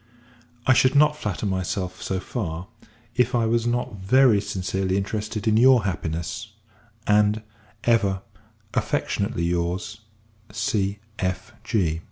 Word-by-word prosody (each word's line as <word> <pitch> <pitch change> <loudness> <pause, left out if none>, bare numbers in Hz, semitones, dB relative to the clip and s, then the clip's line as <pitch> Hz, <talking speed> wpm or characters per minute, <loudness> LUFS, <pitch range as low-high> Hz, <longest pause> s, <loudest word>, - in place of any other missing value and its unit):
I 130 - +6
should 130 +2 +4
not 150 +1 +5
flatter 105 -7 -3
myself 95 -1 -2
so 95 - -2
far, 90 -5 -4 0.5
if 125 +1 +2
I 115 -1 +2
was 115 +1 +1
not 120 -3 -1
very 110 +2 +4
sincerely 95 -1 -1
interested 105 +1 -3
in 110 0 +4
your 125 -1 +6
happiness; 95 +4 -3 0.5
and, 105 +1 +3 0.4
ever, 105 -5 +2 0.5
affectionately 100 -3 -1
your's, 90 +5 -2 0.5
C.F. 100 -1 -2
105 Hz, 110 wpm, -24 LUFS, 95-115 Hz, 0.5 s, I